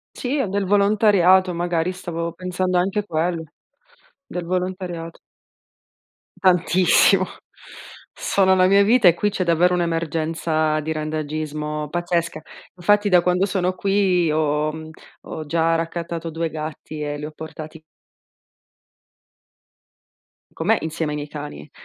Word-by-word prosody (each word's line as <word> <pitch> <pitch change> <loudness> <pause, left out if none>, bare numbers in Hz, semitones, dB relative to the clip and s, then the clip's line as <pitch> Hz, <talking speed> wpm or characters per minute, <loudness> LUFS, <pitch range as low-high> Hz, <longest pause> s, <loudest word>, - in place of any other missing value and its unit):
Sì, 270 +3 -2
o 250 - 0
del 195 +1 -1
volontariato 200 -2 +4
magari, 175 0 -1
stavo 170 -2 -4
pensando 185 +1 -2
anche 195 +3 0
quello, 165 -1 -1 0.8
del 180 -7 -6
volontariato. 180 -2 -4 1.2
Tantissimo. 185 +1 +4 0.9
Sono 190 -1 +2
la 185 0 +4
mia 200 +1 +5
vita 225 0 +4
e 170 - +7
qui 210 - 0
c'è 195 -2 -2
davvero 175 +1 +3
un'emergenza 160 -2 0
di 160 +1 -4
randagismo 155 -1 -3
pazzesca. 170 -1 -2 0.3
Infatti 205 +3 +2
da 180 -2 +5
quando 180 +2 +2
sono 185 -2 -1
qui 190 -4 +1
ho 150 0 0
mhmm, 160 0 -9 0.3
ho 155 - -7
già 165 +1 +1
raccattato 165 0 -4
2 165 +1 -3
gatti 155 0 -7
e 145 0 -3
li 150 - -6
ho 155 - -7
portati 160 0 -9 2.7
con 160 - -5
me, 225 +1 +4
insieme 160 -1 -3
ai 150 - -3
miei 145 0 -6
cani, 145 - -8
170 Hz, 125 wpm, -22 LUFS, 155-185 Hz, 2.7 s, e